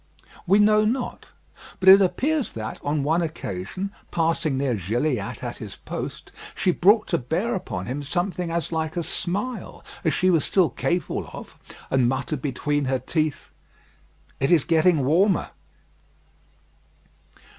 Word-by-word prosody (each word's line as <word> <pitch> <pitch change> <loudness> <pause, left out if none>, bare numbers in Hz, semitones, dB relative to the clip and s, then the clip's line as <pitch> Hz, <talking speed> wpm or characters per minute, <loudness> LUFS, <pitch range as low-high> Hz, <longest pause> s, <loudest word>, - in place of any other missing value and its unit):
We 195 +3 +5
know 215 +1 +5
not: 245 +4 -2 0.5
but 190 - -2
it 195 +1 +10
appears 280 - 0
that, 110 -1 -5
on 145 0 0
one 160 +4 +2
occasion, 160 - -4 0.2
passing 165 -3 0
near 135 -2 0
Gilliatt 115 - -2
at 120 -1 -4
his 105 -3 -8
post, - - -7 0.2
she 185 - +2
brought 205 +5 +4
to - - +1
bear 170 - -1
upon 95 - -4
him 130 +6 -4
something 175 +4 -2
as 170 0 -2
like 160 0 -2
a 170 - 0
smile 205 +8 -4 0.2
as 160 - +2
she 185 0 +3
was 165 -4 +3
still 185 -4 +2
capable 175 0 -2
of, - - -10 0.4
and 130 -2 +3
muttered 135 +2 -2
between 145 +1 -1
her 130 0 +1
teeth, 155 +3 -2 0.9
"It 135 - +1
is 170 -5 +5
getting 165 -3 +3
warmer." 180 +7 +2
160 Hz, 145 wpm, -24 LUFS, 135-185 Hz, 0.9 s, it